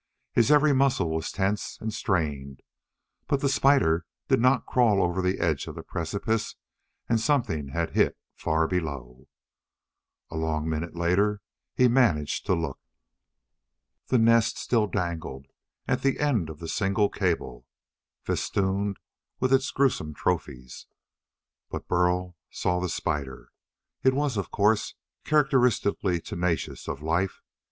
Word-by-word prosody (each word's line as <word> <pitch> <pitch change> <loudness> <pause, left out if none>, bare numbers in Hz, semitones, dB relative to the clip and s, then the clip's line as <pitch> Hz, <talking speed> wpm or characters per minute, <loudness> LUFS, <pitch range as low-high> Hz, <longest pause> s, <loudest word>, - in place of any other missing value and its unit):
His 115 +1 +3
every 150 0 +5
muscle 130 -11 +2
was 80 0 -2
tense 100 +2 -2
and 110 0 -4
strained. 75 -10 -2 0.6
But 140 - 0
the 140 - +2
spider 135 -13 +3 0.2
did - - +4
not 130 +2 +3
crawl 115 -5 +3
over 90 0 +1
the 90 +1 0
edge 80 -5 0
of - - -7
the - - -7
precipice 100 +6 -2 0.5
and 115 - +2
something 115 - 0
had 85 +4 -2
hit - - +2 0.2
far 80 +1 0
below. 70 -8 -4 1.0
A 80 - -5
long 80 -1 -1
minute 80 +2 -3
later 95 +4 +1 0.3
he 125 - +5
managed 115 - +2
to 95 - +3
look. 80 -5 -3 1.3
The 130 - +3
nest 115 0 +4
still 110 -3 +1
dangled 85 -7 -4 0.4
at - - 0
the 135 -1 +1
end 120 - +1
of 80 - -8
the 80 - -7
single 100 +3 +1
cable, 75 -9 -2 0.6
festooned 100 +1 -1 0.4
with 130 +1 +2
its 130 -1 +3
gruesome 120 - 0
trophies. 70 -8 -3 0.8
But - - -6
Burl 90 0 +1
saw 90 0 -1
the 90 0 -2
spider. 70 -6 -3 0.5
It 130 0 +3
was, 145 -3 0
of 100 - -2
course, 105 +1 +1 0.3
characteristically 125 - +2
tenacious 85 0 -3
of 75 +1 -5
life. 85 +4 -1
95 Hz, 135 wpm, -26 LUFS, 80-115 Hz, 1.3 s, every